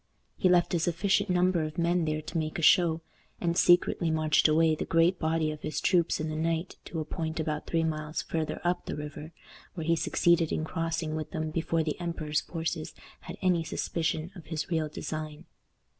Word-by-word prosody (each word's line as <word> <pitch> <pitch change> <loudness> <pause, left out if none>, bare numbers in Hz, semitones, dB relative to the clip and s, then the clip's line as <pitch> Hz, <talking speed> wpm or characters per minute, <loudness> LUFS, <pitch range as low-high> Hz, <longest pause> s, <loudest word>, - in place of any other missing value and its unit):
He 185 - +2
left 175 0 +3
a 175 - +2
sufficient 195 +4 +1
number 180 -1 +3
of 155 0 -4
men 170 0 +2
there 155 0 -2
to 165 - -4
make 155 0 -3
a 165 - -3
show, 165 -1 +5 0.4
and 170 -1 0
secretly 175 -1 +4
marched 155 -1 +3
away 160 +1 +4
the 155 - -2
great 165 +2 +2
body 160 -1 +1
of 150 - -8
his 150 -1 -3
troops 175 -3 +2
in 155 - -2
the 155 - -4
night 165 +2 -1
to 165 - -5
a 155 - -3
point 160 0 -4
about 155 -1 -2
three 165 -1 +1
miles 155 -1 -2
farther 160 -2 -3
up 175 0 -1
the - - -3
river, 150 +1 -7 0.4
where 165 -3 -4
he 165 +1 +3
succeeded 170 0 +2
in - - -1
crossing 165 0 -2
with 155 0 -4
them 155 -1 -3
before 165 0 0
the 155 +1 -3
emperor's 155 -4 -1
forces 160 -1 -4 0.2
had - - -9
any 180 -3 +3
suspicion 160 +1 -2
of 170 -5 -11
his 155 +1 -4
real 160 -2 0
design. 155 0 -6
160 Hz, 200 wpm, -29 LUFS, 155-170 Hz, 0.4 s, show